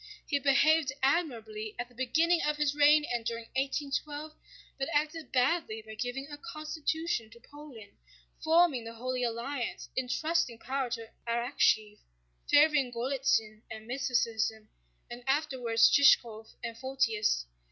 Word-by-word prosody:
He 285 Hz, -, 0 dB
behaved 290 Hz, +1 st, +3 dB
admirably 225 Hz, -8 st, -1 dB
at 245 Hz, -, -4 dB
the 245 Hz, -, -22 dB
beginning 315 Hz, +8 st, +2 dB
of 300 Hz, 0 st, 0 dB
his 295 Hz, -1 st, +1 dB
reign 295 Hz, +1 st, +5 dB
and 240 Hz, -1 st, -1 dB
during 230 Hz, 0 st, -3 dB
1812, 290 Hz, +2 st, -2 dB, 0.5 s
but 270 Hz, -, -2 dB
acted 305 Hz, +2 st, -1 dB
badly 250 Hz, -4 st, 0 dB
by 220 Hz, -, -9 dB
giving 245 Hz, +5 st, -4 dB
a 290 Hz, 0 st, -9 dB
constitution 315 Hz, -5 st, -3 dB
to 235 Hz, +1 st, -16 dB
Poland, 255 Hz, -6 st, -13 dB, 0.4 s
forming 320 Hz, -6 st, +4 dB
the 230 Hz, 0 st, -8 dB
Holy 255 Hz, +2 st, -3 dB
Alliance, 240 Hz, +2 st, -3 dB
entrusting 260 Hz, 0 st, 0 dB
power 265 Hz, +2 st, -3 dB
to 230 Hz, -2 st, -6 dB, 0.2 s
Arakchéev, 230 Hz, -3 st, +1 dB, 0.5 s
favoring 290 Hz, -4 st, +4 dB
Golítsyn 240 Hz, -3 st, 0 dB
and 220 Hz, 0 st, -9 dB
mysticism, 230 Hz, -4 st, -1 dB, 0.4 s
and 240 Hz, +1 st, -8 dB
afterwards 260 Hz, -6 st, +3 dB
Shishkóv 230 Hz, -6 st, +3 dB
and 230 Hz, -1 st, -5 dB
Photius. 230 Hz, -, 0 dB
260 Hz, 130 wpm, -30 LUFS, 230-295 Hz, 0.5 s, reign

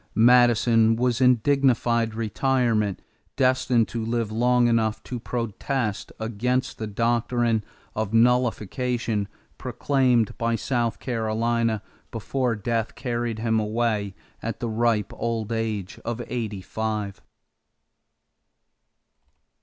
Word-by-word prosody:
Madison 115 Hz, -1 st, +5 dB
was 125 Hz, +1 st, 0 dB
in 125 Hz, 0 st, +6 dB
dignified 120 Hz, -5 st, +2 dB
retirement, 115 Hz, -2 st, 0 dB, 0.3 s
destined 130 Hz, -3 st, +2 dB
to 115 Hz, -1 st, -4 dB
live 115 Hz, -1 st, -1 dB
long 120 Hz, +2 st, +3 dB
enough 115 Hz, -1 st, +1 dB
to 125 Hz, -, -5 dB
protest 115 Hz, -1 st, -3 dB
against 125 Hz, +4 st, -1 dB
the 110 Hz, -, -3 dB
doctrine 115 Hz, +1 st, +1 dB, 0.3 s
of 110 Hz, -1 st, -2 dB
nullification 120 Hz, -2 st, +1 dB, 0.3 s
proclaimed 125 Hz, -2 st, +1 dB
by 115 Hz, 0 st, +1 dB
South 120 Hz, 0 st, -1 dB
Carolina 115 Hz, -1 st, -1 dB, 0.3 s
before 120 Hz, +1 st, -1 dB
death 115 Hz, +1 st, -2 dB
carried 120 Hz, -3 st, -2 dB
him 110 Hz, 0 st, +1 dB
away 105 Hz, -2 st, -1 dB, 0.3 s
at 115 Hz, -, -4 dB
the 120 Hz, -, -2 dB
ripe 110 Hz, -2 st, +1 dB
old 115 Hz, -1 st, -3 dB
age 110 Hz, -4 st, -3 dB
of 120 Hz, +1 st, -3 dB
eighty 110 Hz, -5 st, -3 dB
five. 105 Hz, 0 st, -3 dB
115 Hz, 105 wpm, -25 LUFS, 110-120 Hz, 0.3 s, in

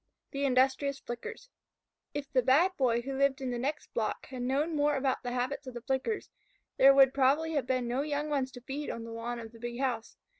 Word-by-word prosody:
THE 280 Hz, 0 st, -1 dB
INDUSTRIOUS 265 Hz, +2 st, +2 dB
FLICKERS 455 Hz, -, -7 dB, 0.6 s
If 285 Hz, -1 st, -5 dB
the 255 Hz, -, +5 dB
Bad 285 Hz, +10 st, +4 dB
Boy 240 Hz, -5 st, +1 dB
who 270 Hz, +1 st, -4 dB
lived 275 Hz, 0 st, +2 dB
in 260 Hz, -2 st, -3 dB
the 240 Hz, -, -2 dB
next 290 Hz, +4 st, -3 dB
block 220 Hz, -2 st, -2 dB
had 255 Hz, -2 st, -7 dB
known 285 Hz, +6 st, 0 dB
more 295 Hz, 0 st, +2 dB
about 265 Hz, -1 st, 0 dB
the 245 Hz, -, -4 dB
habits 250 Hz, +2 st, -2 dB
of 250 Hz, -1 st, -6 dB
Flickers, 270 Hz, -, -1 dB, 0.5 s
there 275 Hz, -, +8 dB
would 270 Hz, -1 st, +7 dB
probably 280 Hz, +4 st, +3 dB
have 285 Hz, -5 st, 0 dB
been 255 Hz, -2 st, 0 dB
no 245 Hz, +3 st, 0 dB
young 295 Hz, 0 st, -2 dB
ones 275 Hz, -3 st, -1 dB
to 245 Hz, -, -10 dB
feed 280 Hz, +4 st, -5 dB
on 230 Hz, -, -4 dB
the 230 Hz, -, -8 dB
lawn 230 Hz, +1 st, -4 dB
of 225 Hz, -1 st, -8 dB
the 230 Hz, -, -15 dB
big 240 Hz, +1 st, -5 dB
house. 245 Hz, -4 st, -2 dB
265 Hz, 220 wpm, -31 LUFS, 245-285 Hz, 0.6 s, there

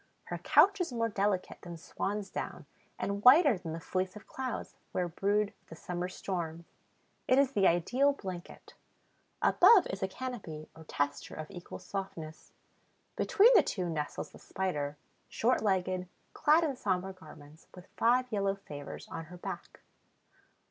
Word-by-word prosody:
Her -, -, -5 dB
couch 400 Hz, -1 st, +5 dB
is 340 Hz, -, -1 dB
more 230 Hz, -1 st, 0 dB
delicate 200 Hz, -2 st, -1 dB
than 175 Hz, -1 st, -8 dB
swan's 200 Hz, +4 st, -4 dB
down -, -, -5 dB, 0.3 s
and 200 Hz, +1 st, -3 dB
whiter 275 Hz, 0 st, +8 dB
than 170 Hz, -3 st, -6 dB
the 165 Hz, -, -4 dB
fleece 185 Hz, +3 st, -2 dB
of 210 Hz, -, -11 dB
clouds 260 Hz, -2 st, -5 dB, 0.2 s
where 180 Hz, -1 st, 0 dB
brood 200 Hz, +4 st, 0 dB
the 165 Hz, -, -10 dB
summer 180 Hz, +2 st, -4 dB
storms. 170 Hz, -3 st, -4 dB, 0.6 s
It 255 Hz, -, +5 dB
is 275 Hz, -1 st, +4 dB
the 200 Hz, -7 st, +4 dB
ideal 245 Hz, +12 st, +3 dB
blanket. 185 Hz, -9 st, -8 dB, 0.7 s
Above 435 Hz, -6 st, +7 dB
is 190 Hz, -, -5 dB
a 190 Hz, -, +1 dB
canopy 190 Hz, -10 st, -6 dB
or 160 Hz, 0 st, -13 dB
tester 145 Hz, -1 st, -2 dB
of 155 Hz, +2 st, -7 dB
equal 175 Hz, -3 st, -8 dB
softness. 170 Hz, -5 st, -7 dB, 0.6 s
Between 435 Hz, +5 st, +5 dB
the 430 Hz, -, +8 dB
two 180 Hz, -4 st, -2 dB
nestles 150 Hz, -2 st, -4 dB
the -, -, -14 dB
Spider, 150 Hz, -6 st, -3 dB, 0.3 s
short 250 Hz, +3 st, +1 dB
legged, 185 Hz, -3 st, 0 dB, 0.3 s
clad 315 Hz, +2 st, +4 dB
in 290 Hz, -4 st, 0 dB
somber 190 Hz, -4 st, -1 dB
garments, 155 Hz, -3 st, -15 dB
with 180 Hz, -1 st, -12 dB
five 250 Hz, +2 st, +3 dB
yellow 200 Hz, -2 st, +1 dB
favors 145 Hz, -8 st, -9 dB
on 165 Hz, 0 st, -6 dB
her 180 Hz, +3 st, -11 dB
back. -, -, -7 dB
190 Hz, 155 wpm, -31 LUFS, 170-230 Hz, 0.7 s, whiter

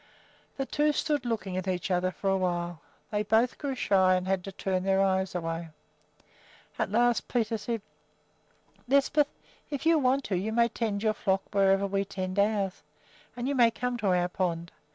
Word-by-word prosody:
The 270 Hz, -, -1 dB
two 295 Hz, +2 st, +1 dB
stood 295 Hz, -4 st, -1 dB
looking 195 Hz, -5 st, -2 dB
at 185 Hz, 0 st, -3 dB
each 185 Hz, 0 st, -2 dB
other 180 Hz, 0 st, +2 dB
for 190 Hz, +2 st, -5 dB
a -, -, +3 dB
while; 175 Hz, -2 st, -2 dB, 0.3 s
then 210 Hz, -1 st, 0 dB
both 230 Hz, +3 st, +3 dB
grew 280 Hz, -3 st, -2 dB
shy 190 Hz, -6 st, +3 dB
and 185 Hz, 0 st, -2 dB
had 190 Hz, -1 st, 0 dB
to 195 Hz, -, -6 dB
turn 190 Hz, -1 st, -1 dB
their 190 Hz, +1 st, +2 dB
eyes 190 Hz, -1 st, +1 dB
away. 165 Hz, -1 st, -3 dB, 1.1 s
At -, -, 0 dB
last 240 Hz, +1 st, +2 dB
Peter 230 Hz, -2 st, 0 dB
said: 225 Hz, 0 st, -3 dB, 1.0 s
"Lisbeth, 280 Hz, +2 st, +3 dB, 0.4 s
if 285 Hz, 0 st, -4 dB
you 325 Hz, -1 st, +5 dB
want 270 Hz, 0 st, +2 dB
to, 195 Hz, -, -2 dB
you 205 Hz, +5 st, -2 dB
may 235 Hz, 0 st, +3 dB
tend 215 Hz, -3 st, -2 dB
your 215 Hz, -1 st, +2 dB
flock 195 Hz, -2 st, 0 dB
wherever 195 Hz, 0 st, +3 dB
we 195 Hz, 0 st, 0 dB
tend 190 Hz, 0 st, -4 dB
ours, 200 Hz, -2 st, +1 dB, 0.5 s
and 245 Hz, +1 st, -3 dB
you 285 Hz, -, 0 dB
may 240 Hz, -4 st, +5 dB
come 250 Hz, +2 st, -3 dB
to 210 Hz, -, -1 dB
our 180 Hz, -1 st, +3 dB
pond. 170 Hz, -2 st, -2 dB
200 Hz, 185 wpm, -28 LUFS, 185-240 Hz, 1.1 s, you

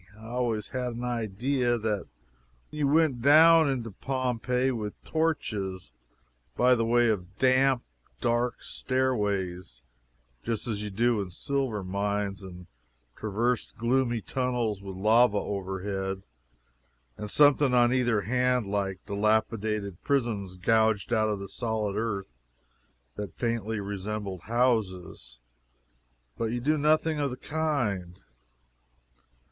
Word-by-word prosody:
I 110 Hz, -, -13 dB
always 120 Hz, -3 st, -1 dB
had 125 Hz, -1 st, -3 dB
an 120 Hz, -, -5 dB
idea 120 Hz, +2 st, 0 dB
that 105 Hz, -2 st, -2 dB, 0.6 s
you 150 Hz, -2 st, 0 dB
went 145 Hz, -4 st, +3 dB
down 160 Hz, +3 st, +7 dB
into 120 Hz, -5 st, -2 dB
Pompeii 125 Hz, +2 st, -1 dB
with 105 Hz, -4 st, -5 dB
torches, 105 Hz, -, -2 dB, 0.7 s
by 125 Hz, +1 st, +5 dB
the 115 Hz, -2 st, +2 dB
way 120 Hz, +1 st, +3 dB
of 95 Hz, -4 st, -3 dB
damp, 130 Hz, -1 st, +3 dB, 0.4 s
dark 120 Hz, -, 0 dB
stairways, 100 Hz, -, -2 dB, 0.6 s
just 115 Hz, 0 st, -3 dB
as 105 Hz, -3 st, -2 dB
you 105 Hz, -, -4 dB
do 115 Hz, +2 st, +1 dB
in 95 Hz, -, -5 dB
silver 125 Hz, +1 st, -2 dB
mines, 100 Hz, +1 st, -2 dB
and 90 Hz, -2 st, -10 dB, 0.5 s
traversed 110 Hz, +3 st, -1 dB
gloomy 120 Hz, 0 st, +1 dB
tunnels 120 Hz, -6 st, -1 dB
with 95 Hz, -1 st, -7 dB
lava 110 Hz, +2 st, +4 dB
overhead 95 Hz, 0 st, -3 dB, 0.9 s
and 105 Hz, -, -6 dB
something 145 Hz, +1 st, +5 dB
on 120 Hz, 0 st, +4 dB
either 120 Hz, -4 st, +2 dB
hand 125 Hz, +2 st, +1 dB
like 100 Hz, -2 st, -2 dB
dilapidated 105 Hz, -2 st, 0 dB
prisons 115 Hz, -9 st, -1 dB
gouged 110 Hz, +2 st, +2 dB
out 110 Hz, -1 st, +2 dB
of 105 Hz, -, -1 dB
the 100 Hz, -, -6 dB
solid 110 Hz, -2 st, -2 dB
earth, 100 Hz, -, -3 dB, 0.8 s
that 105 Hz, -4 st, -6 dB
faintly 115 Hz, -2 st, -2 dB
resembled 100 Hz, -1 st, -4 dB
houses. 105 Hz, -, -1 dB, 1.0 s
But -, -, 0 dB
you 120 Hz, +2 st, -2 dB
do 150 Hz, +6 st, +2 dB
nothing 155 Hz, +1 st, +2 dB
the 140 Hz, -3 st, -2 dB
kind. 120 Hz, -, -2 dB
115 Hz, 120 wpm, -28 LUFS, 100-125 Hz, 1.0 s, down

